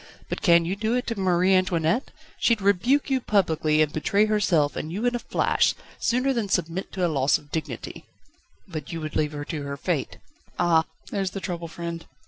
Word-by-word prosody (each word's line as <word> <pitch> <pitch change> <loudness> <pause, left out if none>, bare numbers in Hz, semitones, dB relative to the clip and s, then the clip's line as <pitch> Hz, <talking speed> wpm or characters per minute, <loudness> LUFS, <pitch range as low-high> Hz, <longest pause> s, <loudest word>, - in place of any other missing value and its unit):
But - - -3
can 170 -4 +5
you 180 +3 -1
do 220 +3 0
it 250 - -1
to 230 -4 -3
Marie 185 0 +3
Antoinette? 185 - +1 0.3
She'd 230 -2 +3
rebuke 230 +9 +2
you 260 -1 +2
publicly, 160 -8 +2
and 150 - -3
betray 200 +7 +2
herself 180 -9 +2
and 155 - -4
you 205 +7 -2
in 245 - +2
a 240 - -1
flash, - - +1 0.2
sooner 255 +3 +1
than 225 -5 -2
submit 180 0 -1
to 185 -2 0
a - - +3
loss 140 -3 +2
of 145 0 -19
dignity." 160 - -5 0.6
"But 155 -6 -6
would - - -10
you 165 - -4
leave 155 0 -1
her 145 0 -5
to 155 -2 -4
her 140 0 -5
fate?" - - -2 0.4
"Ah! 165 -2 +3 0.3
there's 195 -2 -1
the - - -2
trouble, 175 -2 -4
friend. 170 0 -6
180 Hz, 200 wpm, -25 LUFS, 160-210 Hz, 0.6 s, can